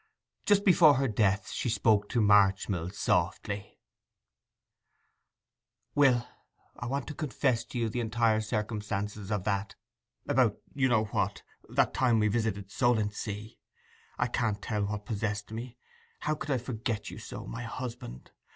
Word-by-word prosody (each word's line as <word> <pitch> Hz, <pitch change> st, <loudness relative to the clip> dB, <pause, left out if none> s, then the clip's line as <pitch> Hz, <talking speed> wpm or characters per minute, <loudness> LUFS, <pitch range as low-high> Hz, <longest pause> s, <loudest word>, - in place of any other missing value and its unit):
Just 205 Hz, -1 st, +4 dB
before 165 Hz, -6 st, +7 dB
her 135 Hz, +1 st, +1 dB
death 100 Hz, -3 st, +1 dB
she 125 Hz, -, -2 dB
spoke 105 Hz, -2 st, +2 dB
to 120 Hz, -, +1 dB
Marchmill 95 Hz, -4 st, +3 dB
softly: 100 Hz, +1 st, -1 dB, 2.2 s
'Will, 130 Hz, -4 st, +4 dB, 0.5 s
I 120 Hz, -, -6 dB
want 140 Hz, +3 st, -2 dB
to -, -, -4 dB
confess 130 Hz, -6 st, 0 dB
to 125 Hz, -, -7 dB
you 115 Hz, -1 st, +1 dB
the 115 Hz, +3 st, -3 dB
entire 115 Hz, -1 st, +2 dB
circumstances 105 Hz, -2 st, -3 dB
of 105 Hz, -3 st, 0 dB
that—about 105 Hz, +3 st, -2 dB, 0.2 s
you 135 Hz, -2 st, +2 dB
know 115 Hz, -3 st, +3 dB
what—that 105 Hz, -, -1 dB
time 125 Hz, -3 st, +3 dB
we 105 Hz, -1 st, +3 dB
visited 105 Hz, -3 st, -1 dB
Solentsea. 105 Hz, -3 st, -1 dB, 0.6 s
I 125 Hz, -, +2 dB
can't 115 Hz, -4 st, -1 dB
tell 105 Hz, -1 st, -1 dB
what 105 Hz, 0 st, -4 dB
possessed 105 Hz, -2 st, -3 dB
me—how 125 Hz, +5 st, -6 dB
I -, -, -2 dB
could 145 Hz, -5 st, -2 dB
forget 115 Hz, -3 st, -3 dB
you -, -, -8 dB
so, -, -, -8 dB
my 115 Hz, -, -6 dB
husband! 120 Hz, -, -7 dB
110 Hz, 135 wpm, -30 LUFS, 105-125 Hz, 2.2 s, before